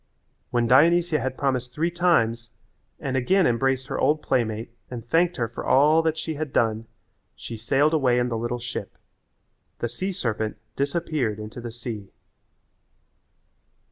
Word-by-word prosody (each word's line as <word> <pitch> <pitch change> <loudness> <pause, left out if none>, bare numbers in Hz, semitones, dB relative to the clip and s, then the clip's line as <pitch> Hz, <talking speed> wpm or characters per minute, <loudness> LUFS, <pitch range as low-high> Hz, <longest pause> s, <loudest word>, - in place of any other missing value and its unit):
When 120 -1 +1
Dionysia 160 +6 +4
had 130 -1 -3
promised 130 -2 -1
three 165 +3 0
times 120 -10 +2 0.5
and 135 -1 -3
again 180 +9 +3
embraced 130 +2 +1
her - - -4
old 150 +3 +2
playmate 115 -2 -1 0.2
and 120 -2 -7
thanked 170 +5 +2
her 115 -3 0
for 115 - -7
all 150 +4 +5
that 160 -1 0
she 160 0 -3
had 150 -1 -4
done 110 -2 +1 0.5
she 115 - -7
sailed 135 +7 +2
away 130 -6 +3
in 125 0 +2
the 120 - -2
little 120 +2 -2
ship. 120 +1 -6 0.8
The - - -2
sea 185 +12 -3
serpent 110 - -2 0.2
disappeared 140 -6 -1
into 110 +3 -8
the 120 -1 -6
sea. 115 -4 -7
130 Hz, 150 wpm, -25 LUFS, 115-155 Hz, 0.8 s, all